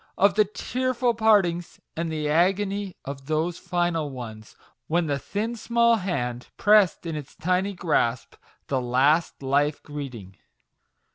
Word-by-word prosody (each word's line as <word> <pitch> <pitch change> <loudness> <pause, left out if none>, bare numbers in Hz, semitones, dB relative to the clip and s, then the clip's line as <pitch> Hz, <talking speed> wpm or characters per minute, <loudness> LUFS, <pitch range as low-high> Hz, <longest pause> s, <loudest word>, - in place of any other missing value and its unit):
of 200 +1 +4
the 215 +1 +4
tearful 250 +3 -1
partings, 200 -6 +2 0.2
and 165 0 -2
the 155 -1 -2
agony 195 +4 +1
of 135 -1 -7
those 160 +3 -1
final 175 -4 -1
ones, 110 -5 -9 0.3
when 170 +2 +1
the 140 -2 -1
thin, 215 - -3
small 235 0 +3
hand, 125 - -3
pressed 205 -4 +4
in 165 -2 -3
its 145 -2 -8
tiny 185 +3 0
grasp 130 -9 0 0.3
the 135 -2 0
last 135 +6 +2
life 145 +2 +1
greeting 125 -10 -8
170 Hz, 135 wpm, -25 LUFS, 140-200 Hz, 0.3 s, of